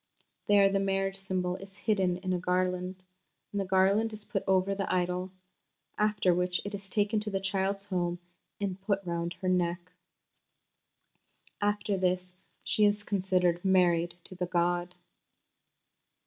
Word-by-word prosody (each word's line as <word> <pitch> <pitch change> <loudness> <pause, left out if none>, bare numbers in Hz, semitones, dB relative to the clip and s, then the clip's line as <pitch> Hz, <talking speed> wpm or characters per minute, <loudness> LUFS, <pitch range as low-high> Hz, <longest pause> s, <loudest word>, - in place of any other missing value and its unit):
There 200 -1 +6
the 195 0 +1
marriage 195 0 0
symbol 185 -2 -2
is 195 +1 -12
hidden 195 -4 +1
in 185 0 -2
a 180 - 0
garland, 180 +1 -1 0.5
and 205 - -1
the - - -2
garland 195 +4 +3
is 210 -1 -10
put 195 - -2
over 190 +1 +3
the 195 -1 -2
idol, 180 0 0 0.6
after 210 -3 +2
which 180 0 +1
it 205 - -5
is 195 -1 -6
taken 210 +2 +1
to 210 0 -4
the 195 -1 -1
child's 195 +1 -1
home 175 -3 -1 0.4
and 195 -2 -3
put 195 -1 -1
round 170 0 -2
her - - 0
neck." 180 0 0 1.7
After 205 0 0
this 180 0 0 0.3
she 215 - +1
is 205 0 +3
considered 185 -3 +1
married 175 -3 +3
to - - -9
the 180 -1 -3
god. 175 0 0
190 Hz, 150 wpm, -30 LUFS, 180-200 Hz, 1.7 s, There